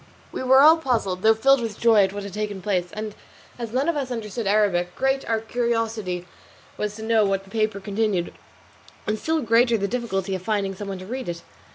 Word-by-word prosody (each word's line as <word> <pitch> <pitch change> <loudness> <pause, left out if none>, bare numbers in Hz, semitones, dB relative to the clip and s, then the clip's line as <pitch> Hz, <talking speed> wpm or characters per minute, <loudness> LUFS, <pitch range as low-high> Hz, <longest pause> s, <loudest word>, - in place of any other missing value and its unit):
We - - -5
were 260 +1 +6
all 315 +3 +8
puzzled, 225 - -1
though 220 +2 +5
filled 270 +3 +4
with 225 -3 -5
joy 225 -4 +5
at 190 - -4
what 205 0 -6
had 200 -2 -8
taken 210 -1 -3
place; 185 -2 -1
and 215 0 -5 0.5
as 230 -2 -5
none 265 +5 0
of 335 - +1
us 275 -3 -2
understood 225 -2 -4
Arabic, 195 -4 +2
great 270 +1 +1
was - - -13
our 225 -1 0
curiosity 225 -6 -2 0.5
to 210 +1 -3
know 220 -1 +3
what 195 -1 0
the 195 - -18
paper 215 -2 0
contained, 200 -2 -1 0.7
and 215 0 -1
still 320 0 0
greater 230 +1 +4
the 200 -1 -1
difficulty 195 -5 -2
of 185 - -3
finding 195 0 -1
some 200 +1 -7
one 195 -1 -4
to 185 - -9
read 255 +1 -5
it. 170 0 -6
215 Hz, 215 wpm, -24 LUFS, 195-235 Hz, 0.7 s, all